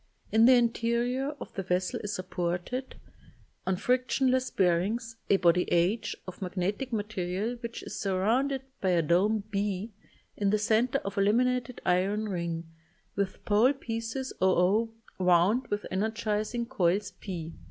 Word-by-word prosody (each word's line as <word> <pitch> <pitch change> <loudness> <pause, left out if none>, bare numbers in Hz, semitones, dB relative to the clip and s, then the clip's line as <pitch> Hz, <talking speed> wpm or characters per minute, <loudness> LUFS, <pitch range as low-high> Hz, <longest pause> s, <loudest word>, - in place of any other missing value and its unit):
In 225 +1 +6
the 255 - +8
interior 240 +4 +1
of - - -9
the 195 - -3
vessel 185 +6 -1
is 205 - -3
supported, 180 +7 -3 0.7
on 190 - +2
frictionless 255 +4 +1
bearings, 205 +6 0
a 200 - +5
body 180 -1 +3
h 190 +6 +1
of 185 - -9
magnetic 195 +7 -2
material 205 0 -2
which 235 -1 -7
is 210 - -6
surrounded 230 +8 +1 0.2
by 190 - +1
a 175 -2 +3
dome 200 +7 +2
b 200 +1 -2 0.4
in 200 -1 +1
the 215 - +3
center 225 +5 +2
of 200 0 -2
a - - +4
laminated 250 +4 +1
iron 200 +4 +1
ring, 170 -3 -2 0.5
with 200 -1 -3
pole 220 +6 +4
pieces 230 0 -4
oo 190 +5 +3 0.3
wound 180 +7 +3
with 205 0 -2
energizing 215 +3 -1
coils 200 -4 +1
p. 175 -4 -6
210 Hz, 140 wpm, -29 LUFS, 185-235 Hz, 0.7 s, the